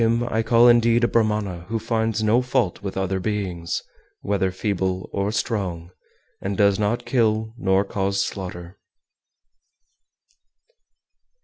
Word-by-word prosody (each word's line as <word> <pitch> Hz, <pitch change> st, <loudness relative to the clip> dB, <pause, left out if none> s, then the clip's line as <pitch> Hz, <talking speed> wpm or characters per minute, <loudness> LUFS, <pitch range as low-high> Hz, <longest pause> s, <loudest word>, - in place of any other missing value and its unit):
405. 115 Hz, +1 st, +3 dB
Him -, -, -2 dB
I 110 Hz, -, +3 dB
call 115 Hz, +1 st, +5 dB
indeed 120 Hz, 0 st, +4 dB
a -, -, +5 dB
Brahmana 105 Hz, -7 st, 0 dB
who 115 Hz, -, 0 dB
finds 110 Hz, -1 st, -1 dB
no 110 Hz, +4 st, +3 dB
fault 125 Hz, -7 st, 0 dB
with 100 Hz, -1 st, -5 dB
other 95 Hz, 0 st, -1 dB
beings, 90 Hz, -5 st, -3 dB, 0.4 s
whether 95 Hz, -2 st, 0 dB
feeble 95 Hz, -1 st, -2 dB
or 100 Hz, +1 st, -1 dB
strong, 90 Hz, -7 st, -3 dB, 0.5 s
and 100 Hz, 0 st, -3 dB
does 100 Hz, -1 st, +3 dB
not 105 Hz, +3 st, 0 dB
kill 110 Hz, -3 st, +1 dB
nor 95 Hz, -3 st, +1 dB
cause 100 Hz, 0 st, -1 dB
slaughter. 90 Hz, -1 st, -7 dB
105 Hz, 130 wpm, -23 LUFS, 95-115 Hz, 0.5 s, call